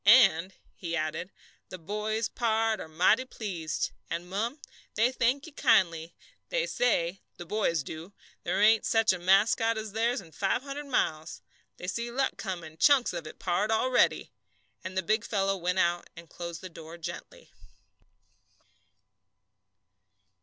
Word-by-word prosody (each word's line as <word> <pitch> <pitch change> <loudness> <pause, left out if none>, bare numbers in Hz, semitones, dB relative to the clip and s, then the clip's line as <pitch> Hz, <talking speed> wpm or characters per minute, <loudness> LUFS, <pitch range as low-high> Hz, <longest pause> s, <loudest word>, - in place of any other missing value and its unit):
"And," 195 -5 +6 0.2
he 170 -2 -4
added, 155 +3 -3 0.4
"the 185 - -7
boys, 210 +5 -2
pard, 225 -1 0
are - - -7
mighty 180 +10 +3
pleased; 185 - -4 0.2
and, 170 +1 -4
mum, 225 - -2 0.4
they 235 +4 +3
thank 260 +2 +1
you 320 - -10
kindly. 170 - +2 0.3
They - - +1
say, 190 - 0 0.2
the 175 - -8
boys 170 -5 0
do, 160 +7 -8 0.3
there - - 0
ain't 220 +1 +5
such 225 -3 +3
a 185 - -4
mascot 210 +5 +3
as 220 -1 -5
theirs 230 +3 +1
in 170 -5 -13
five 200 +7 0
hundred 285 +1 -6
miles; 160 - -1 0.3
they - - -8
see 235 +5 -2
luck 265 +3 0
comin', 170 -6 -6
chunks 280 -4 +5
of 170 -3 -5
it, - - -10
pard, 190 +3 0
already." 245 +3 +2 0.5
And 185 0 -6
the 190 - +1
big 220 +5 +1
fellow 195 -3 0
went 180 0 -1
out 175 -1 +1
and 170 0 -10
closed 170 0 -7
the 185 - -7
door 165 0 -10
gently. 165 - -8
195 Hz, 150 wpm, -29 LUFS, 170-230 Hz, 0.5 s, And